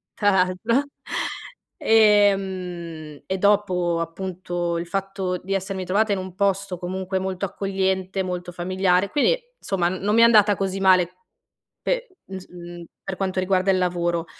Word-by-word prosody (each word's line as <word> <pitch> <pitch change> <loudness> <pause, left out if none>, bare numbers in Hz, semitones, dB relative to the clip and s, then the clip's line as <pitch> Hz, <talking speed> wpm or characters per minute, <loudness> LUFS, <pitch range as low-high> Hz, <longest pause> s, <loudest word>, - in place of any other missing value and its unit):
tra 205 -1 +3
l'altro, 190 +7 +2 0.9
ehm, 190 -7 +2
e 190 - -1
dopo 185 -4 +2
appunto 175 0 -3
il 170 - -5
fatto 195 -1 -2
di 190 +2 -5
essermi 190 -1 -2
trovata 205 +4 +2
in - - -1
un 185 -1 -7
posto 195 -1 0
comunque 190 +1 -3
molto 190 0 -2
accogliente, 190 0 -1
molto 180 -1 -4
familiare. 185 +2 +1
Quindi 395 - +2 0.2
insomma, 180 -3 0
n 185 +1 -5
non 205 +2 +1
mi 230 - +6
è - - +8
andata 210 -3 +6
così 195 0 -2
male 185 -2 +4 0.7
pe - - -2
ins 190 -1 -8
mhmm, 175 -1 -10 0.2
per 190 - -4
quanto 190 -1 -1
riguarda 185 0 +1
il 190 - +2
lavoro. 175 -2 0
190 Hz, 150 wpm, -23 LUFS, 180-195 Hz, 0.9 s, è